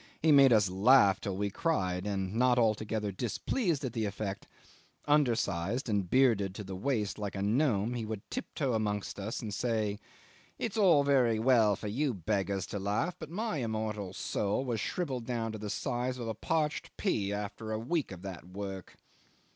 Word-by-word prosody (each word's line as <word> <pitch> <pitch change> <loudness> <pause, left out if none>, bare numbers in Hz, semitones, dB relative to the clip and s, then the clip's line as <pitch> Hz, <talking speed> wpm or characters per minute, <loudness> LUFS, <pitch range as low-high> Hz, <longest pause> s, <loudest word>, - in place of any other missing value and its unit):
He 160 - +5
made 140 -2 +7
us 105 -4 +5
laugh 100 +1 +5
till 100 -3 -3
we 100 0 -1
cried, 95 - -1
and, 95 -1 -2
not 125 +2 +3
altogether 110 -2 +1
displeased 145 - -1
at 125 - -4
the 110 -2 -1
effect, 100 -1 -4 0.6
undersized 120 - +1
and 100 -5 0
bearded 110 -7 +3
to 105 - -5
the 95 -1 -6
waist 105 -1 -1
like 105 -1 -4
a 95 - -3
gnome, 115 -1 +2
he 120 -2 -3
would 110 -2 -6
tiptoe 150 - -2
amongst 105 -2 -2
us 105 +4 -4
and 105 -2 -4
say, 110 -2 -1 0.6
"It's 225 -3 -3
all 180 -9 +5
very 130 -5 +3
well 110 -3 +4
for 105 - -6
you 130 +4 0
beggars 95 0 -1
to 100 - -2
laugh, 105 - -1
but 160 - -7
my 215 +2 -2
immortal 110 -5 -3
soul 105 +6 -1
was 120 -3 -1
shrivelled 130 - -3
down 115 -3 -2
to 110 - -6
the 105 0 -5
size 125 +4 -2
of 120 -2 -5
a 110 - -1
parched 155 +7 -1
pea 105 - 0
after 105 +2 -4
a 110 - 0
week 135 +6 -1
of 90 -1 -9
that 95 -3 -7
work." 95 -1 -7
110 Hz, 180 wpm, -31 LUFS, 100-130 Hz, 0.6 s, made